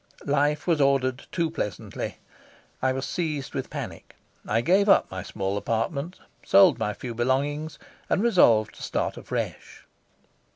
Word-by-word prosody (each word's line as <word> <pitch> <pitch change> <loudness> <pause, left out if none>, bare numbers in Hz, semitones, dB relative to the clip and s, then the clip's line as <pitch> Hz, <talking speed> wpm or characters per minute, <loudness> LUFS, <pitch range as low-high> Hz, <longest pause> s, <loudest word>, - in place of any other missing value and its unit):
Life 145 +1 +1
was 165 -4 +2
ordered 135 -1 +1
too 165 -3 0
pleasantly. 105 - -4 0.6
I 130 - +2
was 130 +1 -3
seized 155 -6 -3
with - - -4
panic. - - -7 0.3
I 115 +2 +2
gave 195 - +3
up - - +5
my 95 -1 -4
small 100 +1 -3
apartment, 140 - -2 0.2
sold 190 -10 +6
my 105 -1 -1
few 120 -2 -6
belongings, 145 +6 -1 0.3
and 200 - +2
resolved 115 - +4
to - - -14
start - - -2
afresh. - - -5
140 Hz, 140 wpm, -26 LUFS, 115-160 Hz, 0.6 s, sold